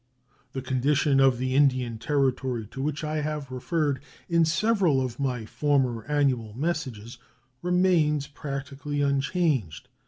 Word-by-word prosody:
The 130 - -4
condition 135 +2 +2
of 135 -2 +5
the 130 +1 -1
Indian 130 -5 +2
Territory, 130 -4 0
to 135 - -6
which 150 +2 -2
I 155 0 -2
have 150 -3 -4
referred 145 +2 -1 0.3
in 170 -1 +3
several 175 -3 +2
of 130 -1 -3
my 125 -5 -1
former 130 -3 0
annual 130 -7 0
messages, 130 -7 -3 0.4
remains 175 -5 +2
practically 140 0 -5
unchanged. 140 - 0
140 Hz, 125 wpm, -26 LUFS, 130-150 Hz, 0.4 s, of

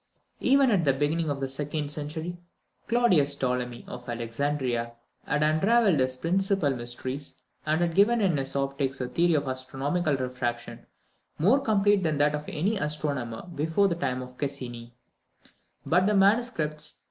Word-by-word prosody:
Even 275 -1 +4
at 190 -5 +2
the 140 -3 +3
beginning 150 +4 0
of 140 -1 -2
the 135 - -1
second 145 +2 -3
century, 160 +4 -5 0.5
Claudius 180 -13 +3
Ptolemy 125 -2 -2
of 125 0 -9
Alexandria 120 0 -2 0.3
had 150 0 +1
unravelled 190 - +3
its 130 0 0
principal 185 +2 +1
mysteries, 130 +3 -3 0.3
and 155 +2 +1
had 170 -1 +1
given 215 +6 +4
in 190 -6 +2
his 135 -1 -2
Optics 135 0 -1
a 125 - -2
theory 170 +6 +2
of 145 -2 0
astronomical 135 +5 -1
refraction 125 -2 -4 0.5
more 215 - +4
complete 205 -5 +2
than 155 -4 0
that 145 +1 +3
of 150 0 -4
any 190 +8 -1
astronomer 145 -7 -1
before 160 +6 +2
the 180 - 0
time 130 -7 -2
of 125 0 -13
Cassini; 120 -4 -5 0.9
but 180 +3 +3
the 210 - +2
MSS. 195 -7 +1
150 Hz, 150 wpm, -27 LUFS, 130-175 Hz, 0.9 s, Even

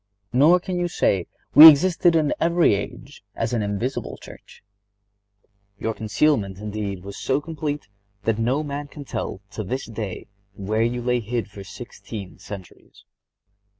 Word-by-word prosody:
Nor 155 +8 +6
can 180 0 -4
you 175 - 0
say: 95 - 0 0.3
"We 155 +2 +13
existed 170 +3 +3
in 155 -3 +2
every 170 -6 +3
age 100 0 -6
as 115 +1 -2
an 115 - +1
invisible 105 +6 -3
church." - - -14 1.1
Your 110 +2 -2
concealment, 110 -2 0
indeed, 100 -2 -5
was 100 0 -8
so 135 +1 0
complete 150 -3 -4 0.4
that 115 +1 0
no 130 +6 +1
man 145 0 -5
can 145 0 -10
tell, 95 - -5
to 110 - -5
this 130 +8 -4
day, 110 -4 -6 0.3
where 105 +3 -1
you 120 +1 0
lay 125 0 +1
hid 115 -1 -4
for 100 -1 -9
sixteen 100 -1 -9
centuries. 100 -1 -12
120 Hz, 150 wpm, -23 LUFS, 100-145 Hz, 1.1 s, We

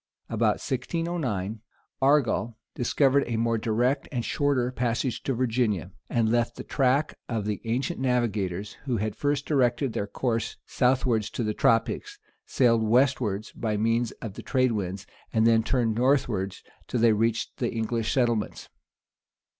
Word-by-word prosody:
About - - +2
1609, 130 - -2 0.4
Argal 135 -5 +2 0.2
discovered 135 +3 +2
a 115 -1 -1
more 115 0 +1
direct 120 +6 0
and 120 -4 -2
shorter 140 -4 +1
passage 120 0 -1
to 135 - -1
Virginia, 115 - 0 0.2
and 115 -2 +1
left 120 0 +1
the - - -7
track 140 +2 +1 0.2
of 110 -3 -2
the 105 -1 -2
ancient 125 +9 -1
navigators, 105 -7 -1
who 125 -4 0
had 105 0 -2
first 145 0 -1
directed 130 -3 +1
their 100 - -2
course 115 0 -2
southwards 125 -4 +1
to 120 - -3
the 105 -1 -1
tropic, 115 - +2 0.4
sailed 115 -3 +3
westward 115 -3 +2
by 110 -2 -1
means 115 +2 +1
of 110 -4 -5
the - - -8
trade 130 -2 +1
winds, 100 -2 -3 0.3
and 110 0 +2
then 115 -1 +5
turned 115 -1 +1
northward, 120 -6 +1 0.3
till 125 - -1
they 115 -1 +5
reached 115 +1 0
the 120 - -1
English 115 0 -1
settlements. 120 -5 0
120 Hz, 145 wpm, -27 LUFS, 110-130 Hz, 0.4 s, then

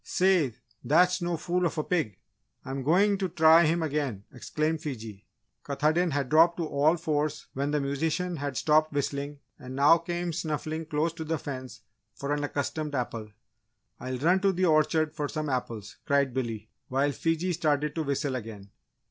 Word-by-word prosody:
"Say, 180 - +2 0.3
that's 180 +5 +3
no 175 -1 -1
fool 180 +3 -1
of 165 - -6
a 155 - 0
pig! 155 - -1 0.5
I'm 135 +1 -4
going 195 +8 +3
to 190 -2 -1
try 160 0 +6
him 165 +2 +1
again!" 140 -9 -2
exclaimed 155 +4 -2
Fiji. 110 -9 -7 0.4
Katahdin 155 +5 +1
had 140 -3 -1
dropped 165 +4 +5
to 170 - -1
all 155 +3 +2
fours 155 -2 -1
when 140 +2 -1
the 150 0 +1
musician 160 +5 -1
had 140 -3 -4
stopped 155 0 +3
whistling 140 0 -3 0.2
and 130 0 -8
now 145 +5 +6
came 175 0 -3
snuffling 155 0 -3
close 155 +1 0
to 165 -1 -6
the 160 +1 -1
fence 130 -6 -7 0.3
for 140 +1 -2
an 145 0 -1
accustomed 145 +1 -3
apple. 115 -4 -3 0.7
"I'll 130 +1 -4
run 170 +8 +3
to 195 0 +3
the 185 0 0
orchard 155 -1 +2
for 150 -2 -2
some 155 -1 -3
apples!" 120 -5 -4
cried 140 -2 +2
Billy, 115 -4 -4 0.2
while 135 +2 +1
Fiji 165 +5 -1
started 150 -2 0
to 165 - -2
whistle 140 -1 -1
again. 105 -5 -8
150 Hz, 175 wpm, -28 LUFS, 135-165 Hz, 0.7 s, try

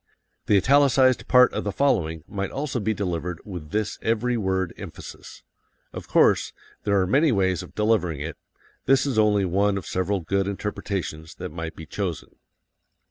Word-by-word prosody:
The 105 - +5
italicized 130 +2 +4
part 125 -1 +6
of - - -2
the 105 - -2
following 80 - 0
might 100 -1 -3
also 135 -2 -3
be 110 0 0
delivered 90 -4 -3
with 90 -7 -8
this 105 +3 -2
every 115 +2 0
word 95 -4 -1
emphasis. - - -10 0.5
Of - - -8
course, - - +3 0.3
there 100 -1 +3
are 95 - +2
many 140 - +3
ways 95 -5 +1
of - - -12
delivering 105 -8 +1
it; 75 +2 -5 0.5
this 135 0 +4
is 130 -6 0
only 105 -2 +3
one 100 +2 +1
of 95 - -6
several 95 +1 -1
good 95 +4 0
interpretations 95 -5 -4
that - - -7
might 80 0 -6
be 80 - -9
chosen. 90 +1 -4
100 Hz, 165 wpm, -24 LUFS, 90-110 Hz, 0.5 s, part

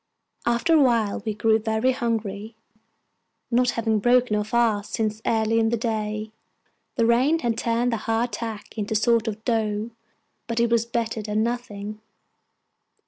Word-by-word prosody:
After 240 +8 +2
a 315 - +6
while 230 -7 +2
we 215 - -1
grew 220 +1 +3
very 220 +3 +1
hungry, 225 -3 -3 1.0
not 245 +1 +3
having 225 -1 +1
broken 245 0 +3
our 210 - +1
fast 215 -2 0
since 215 -1 -1
early 225 0 +2
in 225 0 +2
the 235 - 0
day. 215 -1 -3 0.6
The 230 - +2
rain 255 +7 +3
had 235 -7 -1
turned 235 +1 0
the - - 0
hard 225 +2 -1
tack 225 -2 -6
into 210 +1 -2
a - - -2
sort 230 +1 +2
of 220 0 -5
dough; 220 -1 -1 0.6
but 230 0 -2
it 235 0 +2
was 230 0 +2
better 230 -2 -2
than 210 +1 -1
nothing. 215 -3 -4
225 Hz, 160 wpm, -24 LUFS, 215-235 Hz, 1.0 s, a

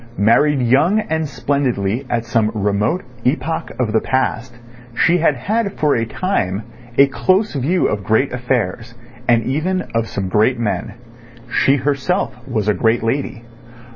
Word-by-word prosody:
Married 130 +6 +3
young 140 - +3
and 160 -6 -2
splendidly 130 -5 -1
at 120 -1 -1
some 115 -2 +1
remote 105 - 0 0.2
epoch 140 +4 -1
of 115 -4 0
the 110 - +3
past, 130 -2 -1 0.4
she 175 +7 +3
had 155 -3 +3
had 200 - -1
for 150 -5 +1
a 115 -1 0
time 110 - -1 0.3
a 140 - +8
close 185 +9 +1
view 155 +7 +1
of 105 -1 -2
great 110 +7 +1
affairs 120 -2 -2 0.3
and 115 -1 +4
even 170 +8 -1
of 115 0 0
some 95 -3 -3
great 110 +6 +2
men. 110 -1 -2 0.6
She 135 - +3
herself 140 +3 -1
was 110 -5 -2
a 105 - +4
great 115 +4 +1
lady. 120 0 -2
125 Hz, 150 wpm, -18 LUFS, 110-150 Hz, 0.6 s, a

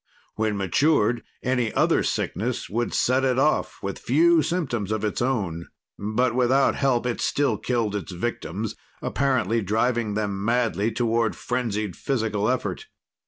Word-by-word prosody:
When 110 -1 -1
matured, 115 - +2 0.2
any 125 -3 +1
other - - +3
sickness 120 +5 -2
would 120 +3 -1
set 130 +2 +2
it 130 -1 +2
off, 150 +3 +1
with 100 0 -4
few 165 +5 +4
symptoms 135 - -2
of 110 -1 -1
its 105 - -1
own. 95 -11 -1 0.3
But 115 +4 0
without 130 +2 +3
help, 130 -3 +1
it 120 -1 -2
still 145 0 +1
killed 115 -5 -1
its 100 -1 -4
victims, 100 +1 -3 0.3
apparently 130 -4 +1
driving 110 +1 0
them 100 -2 -2
madly 115 -1 +1
toward 115 -1 +1
frenzied 110 -6 -2
physical 110 -5 -1
effort. 130 - -2
115 Hz, 140 wpm, -24 LUFS, 105-130 Hz, 0.3 s, few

